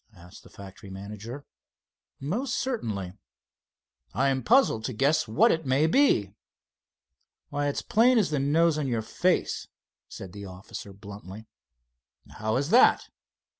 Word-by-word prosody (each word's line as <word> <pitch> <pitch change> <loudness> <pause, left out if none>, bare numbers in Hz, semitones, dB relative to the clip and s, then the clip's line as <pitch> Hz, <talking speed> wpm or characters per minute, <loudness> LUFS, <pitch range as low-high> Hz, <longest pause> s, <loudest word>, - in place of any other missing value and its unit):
asked 90 0 -15
the - - -17
factory 100 0 -12
manager. 105 +8 -8 0.7
"Most 225 - -2
certainly." 105 - -3 1.0
"I 135 +5 +2
am 130 -1 0
puzzled 230 - +3
to 130 - -3
guess 135 +4 +1
what 110 - +4
it 160 - -1
may 135 +4 +3
be." 160 - +3 1.2
"Why, 145 0 -1
it's 145 - -2
plain 245 +3 +4
as 205 -7 +2
the 150 - 0
nose 155 +3 +2
on 145 - -2
your 115 -3 -1
face," - - -1 0.4
said 95 -2 -10
the 100 - -9
officer 95 +2 -9
bluntly. 100 +1 -11 0.9
"How 110 0 -1
is 140 +4 -1
that?" 245 - +5
130 Hz, 135 wpm, -27 LUFS, 100-155 Hz, 1.2 s, that